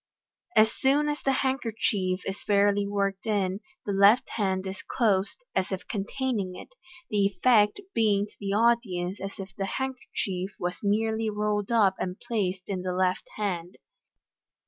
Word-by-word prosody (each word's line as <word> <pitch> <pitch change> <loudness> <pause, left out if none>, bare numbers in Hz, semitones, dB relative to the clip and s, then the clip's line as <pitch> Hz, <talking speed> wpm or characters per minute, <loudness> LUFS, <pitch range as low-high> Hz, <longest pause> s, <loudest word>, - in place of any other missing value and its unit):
As 220 +1 +6
soon 285 +3 +2
as 295 0 -2
the 270 - +2
handkerchief 215 -7 0
is 195 +1 -4
fairly 205 0 +3
worked 200 +1 -1
in, 195 -3 0 0.3
the 205 - -1
left 200 +5 +5
hand 190 -3 -1
is 190 +1 -5
closed, 210 - 0
as 185 - 0
if 190 0 -4
containing 205 -2 -2
it - - -10
j - - -28 0.4
the 205 -2 +3
effect 210 - +3
being 205 -3 +3
to 210 - -17
the 200 -1 -3
audience 210 -5 +1
as 195 +1 -6
if 195 -1 -8
the 195 - -2
handkerchief 200 -8 -3
was 175 0 -3
merely 220 +2 +1
rolled 210 0 -1
up 210 -5 +4
and 180 0 -3
placed 190 -5 -2
in 190 -2 -2
the 180 0 -2
left 185 0 0
hand. 180 -4 -3
200 Hz, 160 wpm, -27 LUFS, 190-220 Hz, 0.4 s, As